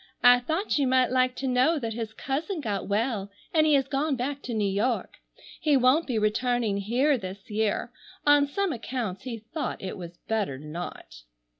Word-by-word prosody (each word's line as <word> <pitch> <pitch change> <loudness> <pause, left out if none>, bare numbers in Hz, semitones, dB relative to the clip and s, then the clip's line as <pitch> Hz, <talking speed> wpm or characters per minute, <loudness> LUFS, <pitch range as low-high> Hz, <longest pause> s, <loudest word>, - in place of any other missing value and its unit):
I 245 0 +8
thought 315 - -1
you 275 - +2
might 255 0 +3
like 255 0 +2
to 265 - -3
know 255 +6 +3
that 230 -5 -3
his 225 -1 -4
cousin 300 - -3
got 210 -8 -3
well 210 -1 0 0.2
and 310 -1 +4
he 300 - +5
has 270 -1 +2
gone 275 +2 0
back 270 +3 -3
to 245 - -5
New 210 -2 +1
York. 215 +5 -1 0.4
He 295 -3 +3
won't 260 +6 +4
be 245 -4 -1
returning 220 0 +1
here 250 +7 +2
this 190 +2 -8
year. 215 0 0 0.3
On 290 -1 +5
some 390 +5 -1
accounts 230 -5 -4
he 240 -3 -4
thought 230 +8 -5
it 190 - -5
was 175 -1 -8
better 210 -11 -2
not." 150 - -8
245 Hz, 185 wpm, -27 LUFS, 210-275 Hz, 0.4 s, I